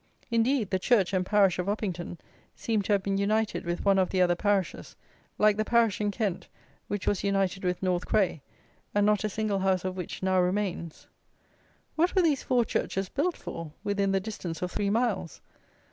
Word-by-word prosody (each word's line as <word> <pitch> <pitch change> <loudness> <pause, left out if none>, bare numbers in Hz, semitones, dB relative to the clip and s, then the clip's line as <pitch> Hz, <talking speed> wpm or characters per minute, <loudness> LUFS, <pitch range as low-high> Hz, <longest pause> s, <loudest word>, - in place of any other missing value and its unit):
Indeed, 230 -1 +1
the 190 - +1
church 200 -2 +2
and 185 -1 +2
parish 195 -2 +3
of 180 - -2
Uppington 180 -5 -3 0.4
seem 220 -3 0
to 200 - -3
have 200 -2 +1
been 195 0 0
united 215 0 0
with 175 +3 -3
one 195 -1 +4
of 185 - +2
the 190 - -1
other 180 -1 +4
parishes, 200 -1 -1 0.4
like 210 0 +4
the 215 - +1
parish 230 -2 +2
in 210 - +1
Kent 205 -4 -2 0.4
which 205 -2 -3
was 200 - 0
united 195 -1 0
with 180 +1 -1
North 180 -1 0
Cray, 190 -8 +1 0.5
and 205 0 +4
not 210 -1 +2
a 215 - 0
single 210 -1 -1
house 190 -1 +1
of 185 0 -2
which 180 0 -6
now 185 0 +3
remains. 180 -3 -2 0.9
What 345 +5 +1
were 375 - +4
these 300 -5 +2
four 245 -3 +2
churches 195 -3 -2
built 325 +5 -1
for 165 -3 -7
within 200 -1 0
the 195 - +2
distance 185 -5 -5
of 180 - -2
three 200 - -1
miles? 215 -6 -1
200 Hz, 190 wpm, -28 LUFS, 185-215 Hz, 0.9 s, one